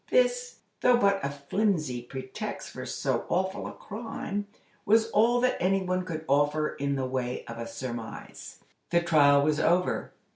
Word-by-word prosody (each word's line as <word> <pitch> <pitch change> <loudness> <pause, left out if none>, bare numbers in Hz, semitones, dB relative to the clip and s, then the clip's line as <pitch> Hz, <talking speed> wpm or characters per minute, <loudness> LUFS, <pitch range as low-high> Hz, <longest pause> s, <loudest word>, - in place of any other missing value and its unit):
This, - - +1 0.2
though 250 -1 +5
but 200 -3 +2
a 140 - 0
flimsy 145 - -1
pretext 130 +2 -6
for - - -7
so - - -1
awful 190 +2 -1
a - - -6
crime, 205 -2 -5 0.4
was 225 +2 +3
all 235 +3 +4
that 255 0 +2
any 190 +2 +2
one 185 0 -1
could 160 -3 -5
offer 145 +2 +2
in 140 0 -2
the 135 -1 -1
way 130 -1 -3
of 115 0 -8
a 115 - -4
surmise. 115 -1 -7 0.3
The 170 0 +3
trial 145 -4 +5
was 150 +1 +2
over. 180 +3 +1
165 Hz, 160 wpm, -28 LUFS, 140-205 Hz, 0.4 s, though